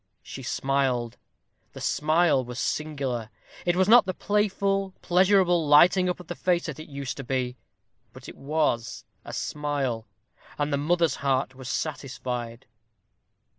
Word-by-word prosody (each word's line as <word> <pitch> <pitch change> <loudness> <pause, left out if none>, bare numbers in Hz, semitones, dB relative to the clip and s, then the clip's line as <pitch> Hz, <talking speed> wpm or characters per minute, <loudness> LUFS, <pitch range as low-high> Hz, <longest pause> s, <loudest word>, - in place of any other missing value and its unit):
She 135 - -8
smiled 130 -2 -1 0.6
the - - -9
smile 155 -2 +2
was 125 0 -8
singular; 135 -7 -2 0.4
it 175 - +3
was 185 +1 +3
not 230 -2 +7
the 185 - -2
playful, 195 -1 0
pleasurable 180 -2 +3
lighting 180 +5 +6
up 180 - -2
of 180 - -10
the 175 - -5
face 175 -1 0
that 150 -3 -6
it 155 - -10
used 140 -2 -5
to 135 - -5
be; 125 -1 -2 0.6
but 130 0 -13
it - - -9
was 135 -7 -1 0.2
a - - -8
smile, 140 -6 -2 0.5
and 145 0 -1
the - - +2
mother's 165 +3 +1
heart 135 -1 0
was 130 -1 -9
satisfied. 125 -5 -4
145 Hz, 145 wpm, -26 LUFS, 130-175 Hz, 0.6 s, not